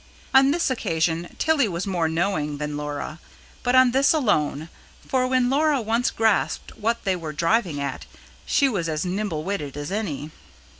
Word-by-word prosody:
On 270 +1 +6
this 320 -2 +1
occasion, 165 -6 -1
Tilly 315 -6 +2
was 175 0 -3
more 175 -4 0
knowing 160 -3 -1
than 150 0 -4
Laura; 150 +2 -5 0.4
but 245 0 +1
on 255 -1 +6
this 275 +6 +4
alone; 160 - +1 0.4
for 255 -1 +1
when 255 -1 +2
Laura 290 +2 +2
once 230 +2 +1
grasped 220 -3 0
what 230 +2 -1
they 190 -2 +1
were 160 -3 -6
driving 170 -1 +1
at, 140 -2 -4 0.4
she 280 - +3
was 185 -10 -1
as 155 +2 -2
nimble 180 -4 -2
witted 150 -7 -4
as 145 +4 -5
any. 160 -8 -3
195 Hz, 165 wpm, -24 LUFS, 155-245 Hz, 0.4 s, On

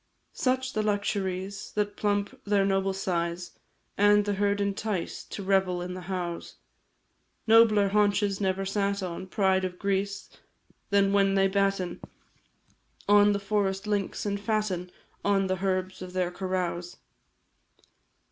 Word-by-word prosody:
Such 260 0 0
the 215 - 0
luxuries 200 -2 -2
That 205 -1 -1
plump 205 +5 -1
their 200 -1 +2
noble 195 0 +1
size, 175 -2 -2 0.5
And 205 0 +5
the 205 - 0
herd 200 +1 +1
entice 200 -2 -2
To 200 - -7
revel 190 -2 +2
in 180 0 -5
the 185 - -7
howes. 175 -1 -5 0.9
Nobler 220 -3 +5
haunches 205 -1 +2
never 190 0 0
sat 200 0 -1
on 185 +1 -5
Pride 190 -2 +2
of 180 -1 -3
grease, 200 0 -2 0.6
than 200 -1 +3
when 195 -1 +3
they 195 0 +4
batten 195 -2 0 1.1
On 205 0 +6
the 200 - 0
forest 200 -1 -1
links, 205 -1 -2
and 200 -1 -1
fatten 200 -4 -1 0.3
On 200 -1 +2
the 185 0 -2
herbs 185 -1 -1
of 180 0 -7
their 180 -1 0
carouse. 180 -2 -3
195 Hz, 135 wpm, -27 LUFS, 185-205 Hz, 1.1 s, On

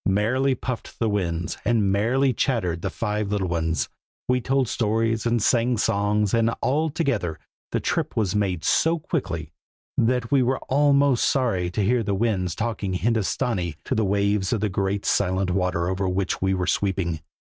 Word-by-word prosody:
Merrily 125 +7 +2
puffed 125 -1 -5
the 115 - 0
winds, 85 -4 -2
and 105 -3 +2
merrily 125 +7 +2
chattered 95 - 0
the 100 - -2
five 105 0 -2
little 100 -3 0
ones; 85 -1 0 0.4
we 125 0 +2
told 135 0 +1
stories, 115 0 0
and 120 0 +2
sang 120 0 +2
songs, 105 -1 +1
and 115 -1 +3
altogether 140 - 0 0.3
the - - 0
trip - - -2
was 105 -3 +1
made 95 -5 0
so 165 +1 +3
quickly 90 - -3 0.5
that 120 0 +1
we 140 -2 +4
were 130 +1 +1
almost 140 -2 +3
sorry 110 -10 0
to 100 +4 -1
hear 120 +4 +2
the 100 -2 -1
Winds 95 -5 0
talking 110 -4 -2
Hindostanee 105 - 0
to - - -1
the 110 -3 +1
waves 100 0 +1
of 115 - 0
the 105 - +1
great 100 +1 -1
silent 95 0 +1
water 90 -2 0
over 95 +1 -1
which 95 0 -1
we 95 0 +1
were 90 -1 -1
sweeping. 90 -4 0
105 Hz, 170 wpm, -24 LUFS, 95-120 Hz, 0.5 s, we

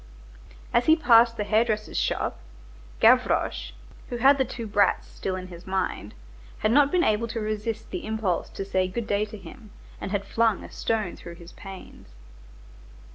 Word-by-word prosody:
As 235 +1 +2
he 315 - +7
passed 235 -6 +5
the 210 - -1
hair 215 +2 +3
dresser's 215 -2 -3
shop - - -1 0.6
Gavroche, - - +3 0.4
who 245 - -3
had 275 +3 +5
the 265 - +3
two 240 -1 -6
brats 205 -2 +2
still 190 - -4
in 185 0 -7
his 175 0 -12
mind, 190 - -3 0.4
had 215 - +1
not 285 +2 +5
been 360 -1 +3
able 215 +2 +1
to 230 - -4
resist 215 +1 -4
the 360 -8 -5
impulse 220 -5 -1
to 195 - -6
say 185 -1 0
good 225 +5 -4
day 205 0 0
to 215 0 -10
him, 215 +2 -13 0.3
and - - -4
had 200 0 -2
flung 225 -3 +1
a - - -11
stone 215 -5 -2
through 170 0 -10
his 170 0 -13
panes. 190 - -12
215 Hz, 180 wpm, -26 LUFS, 190-230 Hz, 0.6 s, he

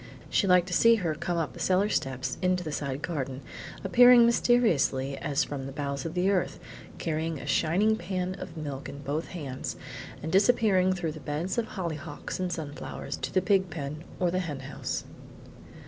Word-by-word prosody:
She 200 - +3
liked 180 -1 +5
to 180 - -5
see 230 +5 +6
her 175 -8 -1
come 170 +3 -2
up 155 -7 -1
the - - -11
cellar 190 +3 +2
steps 130 - -2
into 180 -1 +1
the 155 - -4
side 140 -1 -3
garden, 135 -5 -3 0.4
appearing 245 +4 +8
mysteriously 175 - +3
as 140 -2 +1
from 135 -2 -5
the - - -6
bowels 140 0 -3
of 165 - -7
the 185 +2 +2
earth, 185 -3 0 0.4
carrying 160 0 -2
a - - -8
shining 195 +7 +2
pan 185 -3 -3
of 170 -3 -8
milk 140 -3 -5
in 140 +1 -9
both 145 +4 -2
hands, 140 -7 -5 0.5
and 160 - -3
disappearing 195 -3 +4
through 175 -4 -2
the 155 - -9
beds 155 +9 -2
of 225 - -1
hollyhocks 165 -4 -5
and 185 -1 -1
sunflowers 155 -4 -5
to - - -4
the 185 - +2
pig 190 -1 +3
pen 150 0 -5 0.2
or 180 -2 +2
the 185 - 0
hen 150 -7 -4
house. 135 +1 -4
170 Hz, 185 wpm, -28 LUFS, 145-185 Hz, 0.5 s, appearing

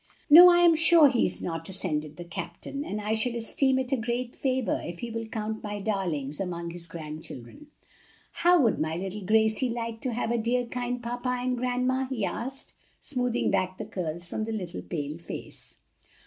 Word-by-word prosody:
"No, 350 +4 +12
I 350 0 +5
am 345 -1 +7
sure 330 -2 +7
he 245 -3 +2
is - - -4
not," 165 0 -4
assented 155 -5 -3
the 175 - -6
captain, 275 +10 -6
"and 210 -8 -4
I 210 +1 -1
shall 235 +2 0
esteem 260 +3 +2
it 260 0 -1
a - - +4
great 240 +1 -3
favor 260 -3 0
if 170 0 -6
he 235 +5 -5
will 225 0 -4
count 220 0 -4
my 205 -1 -4
darlings 175 -9 -2
among 170 -3 -3
his 170 0 -8
grandchildren. 155 - -8 0.6
How 350 0 +4
would 230 -4 +2
my 160 +1 -1
little 195 +3 -4
Gracie 220 +5 +3
like 230 -1 -4
to 255 - -2
have 230 0 -1
a 235 - +1
dear 245 +2 +1
kind 245 +1 -3
grandpa 245 +2 -2
and 250 0 0
grandma?" 255 +1 0
he 230 -7 -1
asked, 265 +6 -4 0.3
smoothing 250 -4 -1
back 185 -1 0
the - - -5
curls 170 -1 -4
from 215 +5 -3
the 225 - -4
little 185 -6 -4
pale 150 -1 -5
face. 170 - -8
225 Hz, 190 wpm, -27 LUFS, 180-250 Hz, 0.6 s, No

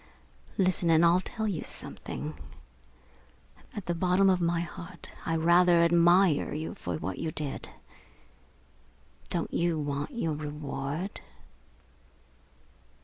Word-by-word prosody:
Listen 185 -3 +2
and 165 +1 +6
I'll 175 +2 +5
tell 220 +3 -3
you 190 -7 -2
something - - -5 1.4
at 205 - -5
the 175 - 0
bottom 185 +3 +3
of 180 -1 +1
my 170 0 +1
heart 170 +1 -9
I 165 - +1
rather 170 +1 +5
admire 170 -2 +4
you 155 +1 -4
for 90 - -4
what 95 +3 -4
you 160 - -2
did. 150 -3 -5 1.6
Don't - - -2
you 170 -1 +1
want 145 -1 -2
your 235 - -2
reward?" 150 +3 -4
170 Hz, 115 wpm, -29 LUFS, 155-180 Hz, 1.6 s, and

